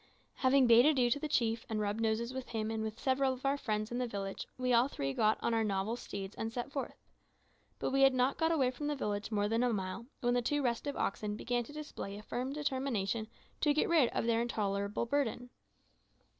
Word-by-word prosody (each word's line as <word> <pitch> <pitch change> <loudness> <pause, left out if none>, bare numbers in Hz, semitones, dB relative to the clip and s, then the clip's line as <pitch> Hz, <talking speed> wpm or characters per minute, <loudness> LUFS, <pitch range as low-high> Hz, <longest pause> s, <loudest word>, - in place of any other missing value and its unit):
Having 260 0 +4
bade 240 +3 +7
adieu 255 -6 +3
to 285 - +2
the 305 - -3
chief 230 -5 +1
and 220 -1 -1
rubbed 210 +1 -1
noses 225 +2 0
with 260 -1 -5
him 220 -1 -2
and 220 -1 -2
with 220 0 -4
several 265 0 +2
of 260 +2 -9
our 275 +1 +3
friends 215 -5 -2
in 240 - -2
the 250 - 0
village, 195 -3 -5
we 255 -1 +1
all 240 +2 +5
three 135 - -3
got 215 +4 +3
upon 235 - -1
our 225 0 +2
novel 200 +2 -1
steeds 200 -4 -6
and 225 0 -3
set 245 +3 -4
forth. 275 - -4 0.8
But - - -2
we 270 +1 +2
had 270 -1 +6
not 255 +2 +1
got 320 0 +3
away 270 -6 +2
from 290 +4 -5
the 295 - 0
village 210 -6 -2
more 205 -1 +1
than 225 +2 +1
a 250 -1 +2
mile 195 +3 -3
when 245 -1 +2
the 245 - +2
two 290 +4 0
restive 250 +4 -1
oxen 210 +1 -1
began 240 +2 -1
to - - -11
display 295 -9 -6
a 210 - -10
firm 255 +5 -3
determination 260 -7 -1 0.3
to 295 -1 +3
get 305 - +2
rid 310 -8 +4
of - - -1
their 230 0 +2
intolerable 200 -2 -1
burden. 245 -2 -1
235 Hz, 225 wpm, -33 LUFS, 215-265 Hz, 0.8 s, bade